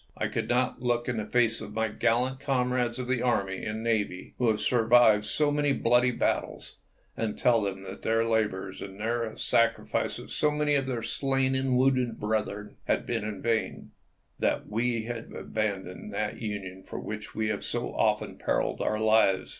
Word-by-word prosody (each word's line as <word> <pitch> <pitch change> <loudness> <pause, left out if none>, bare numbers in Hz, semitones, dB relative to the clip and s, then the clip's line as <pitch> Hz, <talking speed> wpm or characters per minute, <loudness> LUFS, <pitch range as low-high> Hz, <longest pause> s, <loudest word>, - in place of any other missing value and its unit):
I - - -1
could - - -3
not 125 0 +1
look 120 -1 0
in 125 -2 -1
the 105 -1 -3
face 115 -2 +2
of 105 -1 -8
my 110 0 +1
gallant 125 +4 0
comrades 125 -3 0
of 125 - -3
the 130 -2 0
army 100 -6 0
and 110 +1 -3
navy, 105 -5 -1
who 125 - +2
have 110 -1 +2
survived 115 -2 +4
so 145 +7 +2
many 145 -1 +2
bloody 120 0 +3
battles, 125 - -2 0.4
and 110 -2 -2
tell 120 -2 +3
them 95 -1 -3
that 95 +1 -8
their 115 0 +2
labors 105 -4 -1
and 95 0 -8
the 115 0 -1
sacrifice 115 0 +1
of - - -9
so 150 - +2
many 150 0 +1
of 135 -2 +1
our 120 -3 -2
slain 135 +1 0
and 130 -1 +1
wounded 125 -3 +2
brethren 105 -1 -2
had - - 0
been - - -2
in 105 -2 -5
vain, 115 -1 -1 0.5
that - - 0
we 115 +1 0
had 115 0 -6
abandoned 100 -2 -3
that 105 +2 -2
Union 100 -4 -5
for - - -8
which 105 0 -7
we 110 -1 0
have 105 - -2
so - - -3
often - - 0
periled - - 0
our 110 - 0
lives. 110 -3 +3
115 Hz, 185 wpm, -28 LUFS, 105-125 Hz, 0.5 s, survived